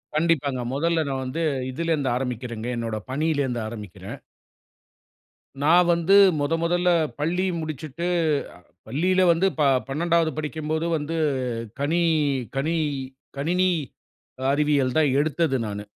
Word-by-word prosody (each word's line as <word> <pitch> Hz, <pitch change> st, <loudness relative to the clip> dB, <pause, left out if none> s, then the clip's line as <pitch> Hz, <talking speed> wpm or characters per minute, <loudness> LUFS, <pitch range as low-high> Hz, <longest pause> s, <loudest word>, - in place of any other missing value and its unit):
கண்டிப்பாங்க. 145 Hz, -5 st, +1 dB
மொதல்ல 165 Hz, +2 st, +1 dB
நான் 135 Hz, -1 st, -2 dB
வந்து 150 Hz, +6 st, -3 dB, 0.3 s
இதிலேருந்து 155 Hz, -2 st, -1 dB
ஆரம்பிக்கிறேங்க. 120 Hz, -2 st, -4 dB
என்னோட 115 Hz, -2 st, -3 dB
பணியிலிருந்து 140 Hz, -5 st, 0 dB
ஆரம்பிக்கிறேன். 105 Hz, -5 st, -8 dB, 1.5 s
நான் 175 Hz, +3 st, +5 dB
வந்து 170 Hz, +3 st, +2 dB, 0.3 s
மொத 145 Hz, +3 st, 0 dB
மொதல்ல 175 Hz, +1 st, +2 dB, 0.3 s
பள்ளி 175 Hz, +5 st, 0 dB
முடிச்சுட்டு 155 Hz, +1 st, -5 dB, 0.8 s
பள்ளியில 180 Hz, +9 st, +1 dB
வந்து 175 Hz, +4 st, +2 dB
ப -, -, +3 dB, 0.3 s
12வது 165 Hz, +3 st, +1 dB
படிக்கும்போது 155 Hz, +1 st, -2 dB
வந்து 155 Hz, +3 st, -4 dB, 0.6 s
கனி 160 Hz, +5 st, +1 dB, 0.6 s
கனி 160 Hz, +5 st, 0 dB, 0.6 s
கணினி 180 Hz, +5 st, +2 dB, 0.8 s
அறிவியல் 145 Hz, -3 st, +1 dB
தான் 150 Hz, -3 st, +4 dB
எடுத்தது 155 Hz, -1 st, +1 dB
நானு. 105 Hz, 0 st, -6 dB
155 Hz, 105 wpm, -24 LUFS, 135-170 Hz, 1.5 s, நான்